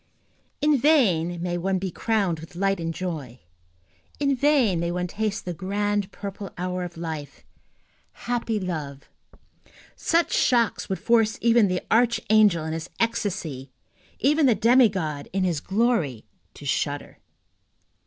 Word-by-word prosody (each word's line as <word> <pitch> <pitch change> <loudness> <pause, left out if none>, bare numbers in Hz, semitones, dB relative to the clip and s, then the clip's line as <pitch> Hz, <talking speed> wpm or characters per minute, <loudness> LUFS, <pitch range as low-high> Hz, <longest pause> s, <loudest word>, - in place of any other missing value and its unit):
In 295 -2 +3
vain 185 - +3
may 175 -1 -2
one 190 +2 0
be 185 0 -3
crowned 200 -5 0
with 165 +2 -12
light 195 +1 0
and 165 0 -2
joy, 155 -9 -5 0.8
in 280 -1 +2
vain 255 - +3
may 170 0 -1
one 180 0 -2
taste 210 +3 -3
the 180 - -3
grand 205 +2 -1
purple 200 0 -7
hour 180 +1 -3
of 175 -1 -7
life, 155 -4 -6 0.8
happy 235 -3 -1
love, 155 -7 -5 0.9
such 335 +1 +1
shocks 235 -4 +2
would 190 - -1
force 225 -1 +2
even 230 -2 +4
the 180 -1 -1
archangel 220 -6 +3
in 160 - -3
his 160 0 -5
ecstasy, 190 - -2 0.5
even 295 +2 +3
the 240 - +4
demigod 195 - +2
in 195 -1 +1
his 175 -5 0
glory, 195 - 0 0.3
to - - -11
shudder. - - -2
195 Hz, 135 wpm, -25 LUFS, 170-230 Hz, 0.9 s, even